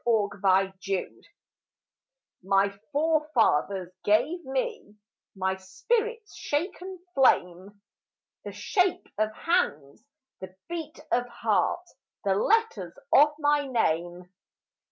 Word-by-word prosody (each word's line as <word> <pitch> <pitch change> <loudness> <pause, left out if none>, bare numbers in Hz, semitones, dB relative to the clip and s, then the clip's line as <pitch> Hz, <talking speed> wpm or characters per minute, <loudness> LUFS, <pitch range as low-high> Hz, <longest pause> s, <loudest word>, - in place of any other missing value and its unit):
Driftwood 195 -3 0 1.1
My 195 +1 +3 0.2
forefathers 280 - +1
gave 310 +12 +2
me 260 -6 -3 0.4
My 190 0 -1
spirit's 450 - -2
shaken 360 +5 -3 0.2
flame, 200 -6 +2 0.6
The - - -6
shape 370 -3 0
of 215 0 +1
hands, 215 - -1 0.4
the 185 0 -9
beat 325 -2 -6
of 245 0 +1
heart, 235 - 0 0.4
The 195 - +2
letters 450 - +1 0.2
of 295 +2 +7
my 290 -1 +2
name. 175 -7 -1
230 Hz, 90 wpm, -27 LUFS, 190-320 Hz, 1.1 s, of